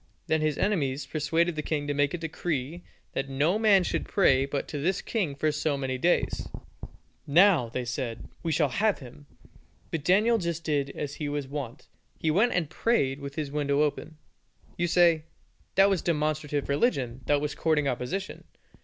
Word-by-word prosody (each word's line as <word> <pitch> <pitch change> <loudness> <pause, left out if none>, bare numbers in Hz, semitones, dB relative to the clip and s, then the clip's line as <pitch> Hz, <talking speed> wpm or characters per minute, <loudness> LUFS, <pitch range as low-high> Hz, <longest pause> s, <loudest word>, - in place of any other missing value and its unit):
Then 160 0 +1
his 155 -2 0
enemies 145 -9 0
persuaded 160 +4 0
the 155 - -2
king 150 -1 -2
to 145 - -1
make 145 +2 +1
a - - -3
decree 165 -1 -3 0.3
that 135 0 -2
no 150 +9 +1
man 205 -4 +5
should - - -2
pray 135 -9 +3
but 140 0 -3
to 145 - -4
this 180 +6 0
king 185 -11 -2
for 155 +2 +1
so 150 -1 -1
many 130 -1 -3
days. 175 +6 +1 0.8
"Now," 165 - +5
they 125 +2 -3
said, 120 -2 -4
"we 165 - -2
shall 150 -2 +2
have 210 - +1
him." 140 +3 -13 0.6
But 160 -3 -3
Daniel 215 +7 +4
just 170 -2 -3
did 145 -3 0
as 145 -1 -4
he 150 -1 -4
was 145 -2 -3
wont, 135 -3 -6 0.3
he 160 - 0
went 215 +9 +3
and 175 -4 0
prayed 145 - 0
with 140 -1 -7
his 150 -3 -3
window 145 0 +1
open. 150 +1 -3 0.6
You 175 - 0
say, 170 -2 +4 0.5
"That 195 +1 +6
was 195 -3 +1
demonstrative 150 -3 -1
religion, 135 - 0
that 145 -1 +3
was 150 0 -2
courting 155 -3 +1
opposition. 135 +10 -3
150 Hz, 180 wpm, -27 LUFS, 140-175 Hz, 0.8 s, That